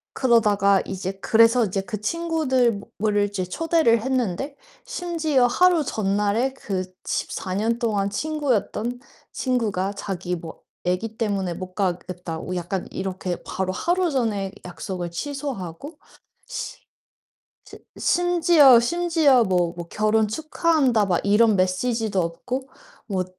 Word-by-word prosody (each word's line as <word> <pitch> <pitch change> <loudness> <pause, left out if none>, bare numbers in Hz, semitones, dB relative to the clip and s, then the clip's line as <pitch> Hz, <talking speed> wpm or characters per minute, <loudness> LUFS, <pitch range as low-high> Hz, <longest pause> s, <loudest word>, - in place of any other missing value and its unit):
그러다가 210 -6 +3
이제 190 -1 -4
그래서 230 +1 +5
이제 195 0 -2
그 215 +1 -6
친구들을 260 -6 0 0.5
이제 200 -2 -3
초대를 235 - +2
했는데 260 +1 -1 0.3
심지어 335 - 0
하루 350 +5 +4
전날에 210 +3 0
그 190 -8 -3 0.2
14 185 - -3
년 225 +4 0
동안 205 -4 0
친구였던 245 -2 -1 0.3
친구가 215 -7 -1
자기 180 -3 -4
뭐 165 -1 -10 0.2
애기 210 +5 -2
때문에 195 -5 -1
못 185 +1 -8
가겠다고 180 -2 -3
약간 180 +1 -3
이렇게 185 -2 -4
바로 185 0 -3
하루 350 - +1
전에 215 -8 -1
약속을 175 0 -5
취소하고 275 - -5 1.7
츠 - - -12 0.2
심지어 340 -7 +5
심지어 315 -2 +3
뭐 180 -3 +1
뭐 170 -1 -7
결혼 215 +1 +2
축하한다 300 - +1
막 175 -2 +2
이런 210 +2 +4
메시지도 195 +2 0
없고 245 +11 -4 0.4
뭐 185 -3 -1
215 Hz, 255 characters per minute, -23 LUFS, 190-270 Hz, 1.7 s, 그래서